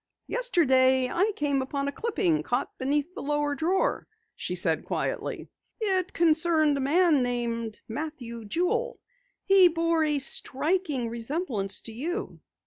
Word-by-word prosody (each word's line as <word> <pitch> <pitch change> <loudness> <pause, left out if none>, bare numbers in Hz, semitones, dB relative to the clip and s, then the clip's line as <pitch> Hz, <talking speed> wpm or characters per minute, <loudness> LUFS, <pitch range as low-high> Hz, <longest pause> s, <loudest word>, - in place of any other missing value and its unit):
"Yesterday 260 - +3
I 395 +5 +1
came 285 -2 0
upon 275 +1 -3
a - - -1
clipping 230 - 0
caught 245 - -2
beneath 290 +5 -1
the - - -7
lower 295 0 -1
drawer," 330 +7 0 0.3
she - - -4
said - - +1
quietly. - - -3 0.3
"It 380 -4 0
concerned 320 -2 +2
a - - -2
man 310 +1 +3
named 235 -3 -3
Matthew 235 -4 -6
Jewel. 395 - -1 0.5
He 385 -2 +7
bore 330 -1 +1
a 300 -1 +1
striking 285 0 +2
resemblance 230 - -2
to 225 - -6
you." 330 - -5
295 Hz, 135 wpm, -26 LUFS, 255-345 Hz, 0.5 s, He